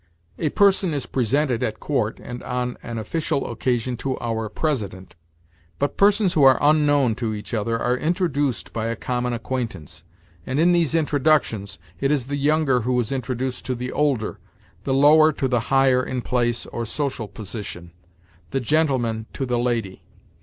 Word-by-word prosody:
A 155 - +1
person 190 -2 +3
is 135 -4 -2
presented 130 +1 0
at 110 - -2
court, 115 -7 -1
and 125 0 -8
on 125 0 -3
an 120 -1 -6
official 140 +6 -2
occasion 125 +1 -1
to 130 +2 -3
our 115 -2 -2
President; 105 - -3 0.6
but 145 0 -1
persons 200 -2 +3
who 155 - +2
are 135 -2 +7
unknown 145 -4 +3
to 110 -3 -2
each 105 +3 -8
other 115 +1 -1
are 125 +1 +1
introduced 145 - -1
by 115 0 -2
a 115 - -2
common 125 +2 -2
acquaintance. 115 - -5 0.4
And 130 - -2
in 170 +2 +5
these 170 -2 +2
introductions, 145 -10 +1 0.2
it 135 - +1
is 140 -4 +1
the 140 +2 -3
younger 145 -3 +2
who 125 +2 0
is 120 0 -2
introduced 130 -1 -3
to 130 - -1
the 125 +1 -4
older; 140 -7 0 0.5
the 135 - 0
lower 155 +3 +6
to 135 - -1
the 125 -2 +1
higher 135 -1 +4
in 125 -1 -3
place 120 -1 0
or 120 - -5
social 130 -1 -2
position; 100 -4 -7 0.6
the 135 - -1
gentleman 125 -5 0
to 135 - -3
the 125 -1 0
lady. 115 -6 -2
125 Hz, 165 wpm, -23 LUFS, 115-145 Hz, 0.6 s, are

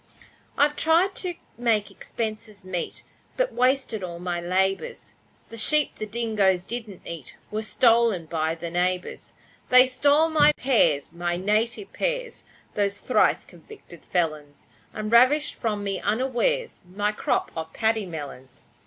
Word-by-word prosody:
I've 290 +1 +3
tried 335 +6 +3
to 360 -2 -3 0.2
make 215 -4 +1
expenses 215 -1 -6
meet, 180 -2 -4 0.3
But - - 0
wasted 255 -4 +1
all 170 -2 -5
my 175 0 -3
labours, 190 - -1 0.4
The 230 - -9
sheep 300 +6 +2
the 215 - -4
dingoes 205 -5 +1
didn't 220 -5 -6
eat 165 -6 -7
Were 215 +1 -2
stolen 225 -4 +3
by 160 0 -1
the 165 0 -6
neighbours. 180 +1 -2 0.4
They 255 0 +8
stole 285 +5 +3
my 300 -1 +5
pears 170 - +2
my 175 0 -2
native 215 - -1
pears - - -3 0.3
Those 200 -1 -1
thrice - - +2
convicted 285 - -15
felons, 155 -5 -3 0.3
And 215 0 -5
ravished 260 +6 +4
from 210 -3 -3
me 195 -1 -2
unawares 260 - 0
My 205 +2 0
crop 210 - -1
of 160 0 -5
paddy 220 -1 0
melons. 145 -5 -9
215 Hz, 135 wpm, -25 LUFS, 180-255 Hz, 0.4 s, They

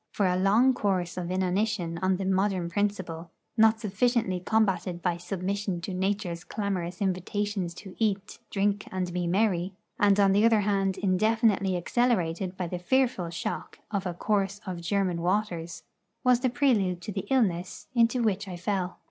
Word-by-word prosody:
For 205 - +1
a 180 -1 +2
long 210 +8 +4
course 185 -7 -1
of 175 -1 -4
inanition 185 -1 0
on 185 0 +2
the 195 - -3
modern 190 -2 +1
principle, 185 -4 -2 0.3
not 220 0 +5
sufficiently 215 -2 +1
combated 185 -3 0
by 175 -2 +1
submission 190 +1 -3
to 190 +2 -5
Nature's 185 -2 -2
clamorous 185 -4 -3
invitations 190 -1 -2
to 190 0 -10
eat, 205 -3 -1
drink, 205 0 0
and 185 -2 -2
be 175 -1 -1
merry, 185 -1 +1 0.2
and 205 -1 +4
on 200 -1 +5
the 205 +2 +4
other 225 -2 +5
hand 195 -1 +1
indefinitely 200 0 +2
accelerated 185 -3 0
by 180 - -2
the 175 +1 -4
fearful 235 -3 +1
shock 165 -1 -5
of 200 -3 -1
a 175 - -4
course 200 +1 0
of 180 -3 -5
German 180 -1 0
waters, 175 -3 -1 0.4
was 250 -2 +4
the 255 0 +1
prelude 225 -9 +2
to 210 - -5
the 195 -1 -4
illness 185 -10 0
into 235 0 +3
which 205 -2 0
I 180 -2 -6
fell. 185 0 -2
195 Hz, 165 wpm, -28 LUFS, 180-210 Hz, 0.4 s, not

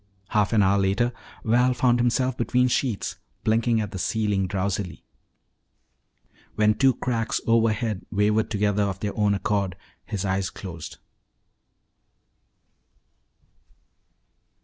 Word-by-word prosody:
Half 105 -3 +2
an 105 -3 +4
hour 100 +1 +3
later 105 +6 +1 0.3
Val 125 +3 +3
found 120 -1 +3
himself 125 +1 +1
between 125 +1 +2
sheets, 120 -4 -1 0.3
blinking 115 +1 +2
at 105 -2 -3
the 95 - -5
ceiling 100 0 0
drowsily. 95 -2 -3 1.5
When 105 0 +4
two 130 +3 +3
cracks 115 -2 -1
overhead 115 -2 +1
wavered 105 +1 +2
together 105 -1 +1
of 100 -2 -1
their 105 0 -3
own 105 -1 +2
accord, 100 -2 -1 0.3
his 100 -2 -3
eyes 95 -1 0
closed. 85 -4 -8
105 Hz, 110 wpm, -25 LUFS, 100-115 Hz, 1.5 s, an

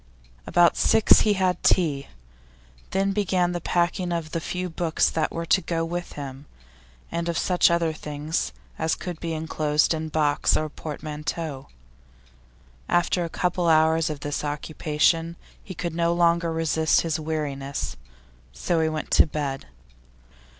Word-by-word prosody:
About 175 -1 +4
six 220 - +5
he 210 - +3
had 185 -2 0
tea, 145 -6 +2 0.8
then 195 +1 +1
began 185 -3 +1
the 175 -1 -3
packing 175 +1 0
of 165 -2 -3
the 165 - -1
few 180 +3 -3
books 165 -1 +1
that 160 - -1
were 165 0 -4
to 190 - +3
go 165 -2 -2
with 175 +1 -5
him, 140 0 -8 0.6
and 170 0 -2
of 170 - -1
such 180 -1 +3
other 170 -2 +1
things 150 +1 -3 0.3
as 160 0 +1
could 175 -3 -6
be 165 -1 -3
enclosed 155 -1 +1
in 160 0 -3
box 150 -2 +2
or 155 0 -2
portmanteau. 150 -1 -5 1.2
After 175 0 +2
a 170 - -4
couple 180 0 -1
of - - +6
hours 160 +1 +2
of 150 -2 -5
this 145 0 -3
occupation 155 +2 0 0.3
he 185 - -8
could 170 0 -4
no 170 0 +1
longer 170 -1 +2
resist 160 -1 +2
his 160 -1 -1
weariness, 145 -3 -3 0.6
so 115 - -1
he 160 - +2
went 155 -1 -4
to - - +6
bed. 140 -3 -4
165 Hz, 150 wpm, -25 LUFS, 150-175 Hz, 1.2 s, of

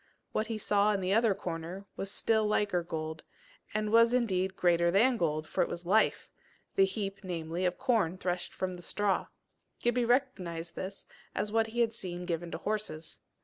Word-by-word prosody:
What 215 - 0
he 225 -1 -2
saw 210 0 +3
in 200 - 0
the 185 0 0
other 225 -2 +4
corner 175 +1 -5
was 195 - -4
still 220 +1 +1
liker 205 -4 +1
gold, 160 -1 -4 0.5
and 215 0 -1
was 230 +2 +6
indeed 190 -6 +1
greater 170 -2 +3
than 230 +8 +4
gold, 155 -6 0
for - - 0
it - - +1
was 175 0 -6
life 215 +5 +3 0.5
the 195 - +5
heap, 195 0 -3
namely, 170 0 -3
of 180 0 0
corn 225 -10 +1
threshed 180 -1 -2
from 185 -1 -3
the - - -10
straw: 200 +3 0 0.5
Gibbie 240 0 +2
recognized 185 -10 0
this 195 +1 -6 0.3
as 205 0 -1
what 225 0 +2
he 240 +2 -1
had 230 -1 +2
seen 180 -4 -5
given 170 -1 -2
to - - -4
horses. 200 -7 -4
195 Hz, 185 wpm, -31 LUFS, 175-220 Hz, 0.5 s, was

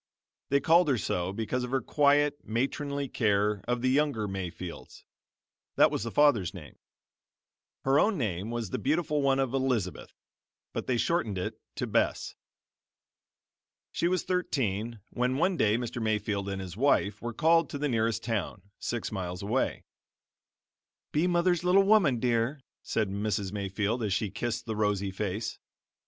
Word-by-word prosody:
They 140 - +4
called 165 +5 +4
her 130 - +3
so 90 -2 -1
because 115 +4 -2
of 125 - -4
her 135 +1 +1
quiet, 145 +1 +3
matronly 140 +4 -2
care 105 -4 +1
of 120 0 -1
the 130 - +3
younger 140 -7 +1
Mayfields 90 -3 -7 0.7
that - - +5
was - - -2
the 115 - -3
father's 115 -9 +3
name. 80 -5 -11 1.0
Her 135 +2 +4
own 215 -1 +3
name 100 - -2
was 115 -5 -3
the - - -2
beautiful 150 +1 +1
one 135 -1 +3
of 135 -2 0
Elizabeth, 125 -9 -1 0.6
but - - -4
they 125 - +1
shortened 115 - 0
it 90 - -4
to - - -2
Bess. - - 0 1.6
She 170 - 0
was 180 -1 +1
thirteen 115 - -1
when 125 +2 0
one 185 +5 +2
day 110 -7 +3
Mr. 120 0 -4
Mayfield 105 -2 -1
and 95 -1 -3
his 95 -2 -7
wife 105 -5 +2
were 120 - -3
called 165 +7 +3
to 145 - -4
the 145 +1 -1
nearest 115 -3 0
town, 105 -3 -3
six 120 -2 -3
miles 90 -2 -4
away. 115 +6 -1 1.3
"Be 155 +4 +2
mother's 175 0 +2
little 185 +2 +5
woman, 195 - +4
dear," 120 +4 0 0.2
said 105 -3 -1
Mrs. 100 -1 -1
Mayfield 100 +3 -2
as 105 -4 0
she 95 0 -1
kissed 120 +3 -3
the 110 -2 -3
rosy 100 -2 0
face. 105 +3 -3
115 Hz, 155 wpm, -29 LUFS, 100-140 Hz, 1.6 s, that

